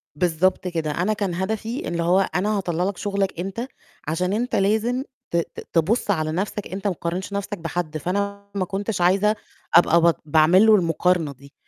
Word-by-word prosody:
بالضبط 180 +3 +1
كده، 165 -3 -2
أنا 180 +8 0
كان 200 -4 -2
هدفي 220 +6 -3
إن 170 0 -2
هو 175 +3 +3 0.2
أنا 205 +2 +1
هطلّع 175 -2 -1
لك 195 0 -2
شُغلك 200 -3 -2
أنت 195 +7 -4 0.4
عشان 180 +5 0
أنت 240 +4 -1
لازم 220 +6 +1 0.3
ت 170 - +1
ت 170 - -4
تبُص 200 +7 +2
على 155 -4 0
نَفْسك 200 +4 -3
أنت 195 +2 -4
متقارنش 180 +2 -3
نَفْسك 200 +1 -3
بحد، 165 -2 -3
فأنا 200 +5 -3
ما 190 - 0
كنتش 200 +1 -3
عايزة 195 +4 +3 0.4
أبقى 170 0 +6
بط 170 0 +3
باعمل 160 +6 +5
له 220 -1 +7
المقارنة 170 -3 +1
دي، 140 +2 -17
185 Hz, 175 wpm, -23 LUFS, 170-200 Hz, 0.4 s, له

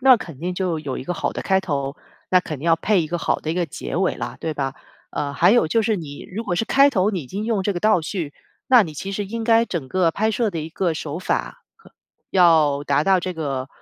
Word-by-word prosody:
那 260 -1 +7
肯 165 - -9
定 180 +4 -3
就 180 -3 -1
有 140 -4 -4
一 - - -7
个 180 - -2
好 - - -2
的 - - -4
开 190 -1 +2
头， 140 -6 -3 0.3
那 185 - +5
肯 155 -6 -6
定 155 - -6
要 165 -1 +5
配 200 +3 +2
一 160 - -2
个 175 - -2
好 170 - 0
的 155 - -3
一 - - -1
个 180 0 +1
结 160 - -6
尾 190 +1 +1
了， - - -5
对 160 - -2
吧？ 135 -3 -3 0.4
呃， 145 -1 -3
还 140 - +4
有 240 -8 +4
就 225 - +2
是 215 -1 +1
你 145 -4 -8
如 215 +5 -5
果 175 - -1
是 225 - +1
开 275 +4 +5
头 205 -4 +2
你 185 - -2
已 - - -12
经 200 +10 -4
用 220 -4 0
这 205 - 0
个 175 - -4
倒 215 -3 +4
叙， 160 -2 -4 0.3
那 250 -3 +7
你 165 -6 -6
其 195 +7 -5
实 205 +1 -2
应 225 +3 -4
该 230 0 +4
整 170 - -4
个 175 +1 +2
拍 215 +6 0
摄 220 0 0
的 170 - -4
一 155 - -5
个 170 +1 -1
手 155 0 -5
法 185 - -3
呵， 450 - -21 0.4
要 160 -6 +4
达 140 +1 +2
到 190 -1 +4
这 185 - -3
个， 140 -5 -3
180 Hz, 290 characters per minute, -22 LUFS, 155-205 Hz, 0.4 s, 那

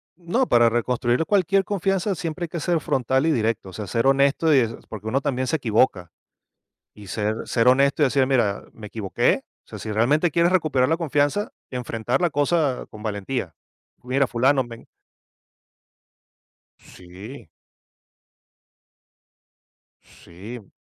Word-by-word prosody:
No, 180 +10 -1
para 120 -1 +5
reconstruir 120 +4 0
cualquier 195 0 +2
confianza 195 0 -1
siempre 170 +1 -4
hay - - -8
que 170 +1 -5
ser 170 +1 0
frontal 130 0 0
y - - +3
directo, 115 -6 -1
o - - -13
sea, 105 - -5
ser 115 +6 0
honesto 140 +3 +3
y 140 - +6
eso, 115 -2 -2
porque 110 0 -8
uno 130 +5 0
también 130 -2 -1
se 160 - +1
equivoca. 110 - +1 0.8
Y 105 -1 -13
ser 105 +3 -1
ser 115 0 +1
honesto 140 +3 +4
y - - +6
decir: 135 0 +2
"Mira, 120 -7 +1
me 110 -1 -10
equivoqué". 105 -2 0 0.2
O - - -42
sea, - - -9
si 110 - -5
realmente 140 +11 +2
quieres 170 +3 +2
recuperar 155 -8 +2
la 165 - +2
confianza, 150 +4 0 0.2
enfrentar 125 0 -2
la 175 - +3
cosa 145 -2 0
con 105 0 -12
valentía. 100 - -4 0.5
"Mira, 130 +2 +1
fulano, 130 +3 +2
me" 115 -1 -12 1.9
Sí. 95 - -12 2.5
Sí. 100 +5 -12
130 Hz, 145 wpm, -23 LUFS, 110-155 Hz, 2.5 s, y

